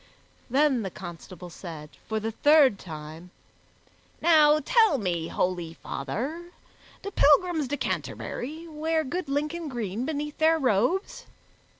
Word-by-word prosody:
Then 270 -1 +3
the 195 - -3
constable 175 0 -10
said, 160 -4 -9 0.2
for 220 0 0
the 220 +1 -3
third 285 -4 +5
time, 160 +1 -9 0.9
"Now 305 -2 +5
tell 445 - +4
me, 175 -7 -2
holy 175 -3 -2
father, 265 - -5 0.5
do 400 - -5
pilgrims 315 -2 +3
to 290 +3 -2
Canterbury 310 +4 -4
wear 315 +1 -1
good 325 +2 -4
Lincoln 300 +4 -2
green 230 -4 -3
beneath 295 0 -4
their 320 +1 +4
robes? 255 - 0
275 Hz, 120 wpm, -26 LUFS, -, 0.9 s, third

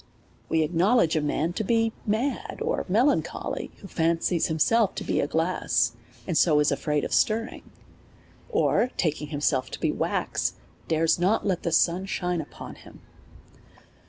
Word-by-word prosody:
We 160 -1 +2
acknowledge 175 +3 +2
a 155 - +2
man 155 +3 -1
to 215 - -2
be 225 +1 +1
mad 230 +7 -1
or 465 +2 -2
melancholy, 240 +10 0
who 200 - -9
fancies 165 0 +1
himself 200 +7 +2
to - - -4
be - - 0
glass, 160 -7 +1 0.3
and 170 - -2
so 155 -2 +4
is 150 - +3
afraid 150 -1 0
of - - -3
stirring; 225 +2 0 0.8
or, 435 - +2
taking 150 -3 -1
himself 145 -3 0
to - - -7
be - - +1
wax, - - -1 0.3
dare 160 0 +1
not 190 +5 +2
let 190 -4 0
the 170 - -2
sun 175 +4 +2
shine 180 -3 -1
upon 150 - -10
him. - - -15
175 Hz, 150 wpm, -26 LUFS, 155-220 Hz, 0.8 s, so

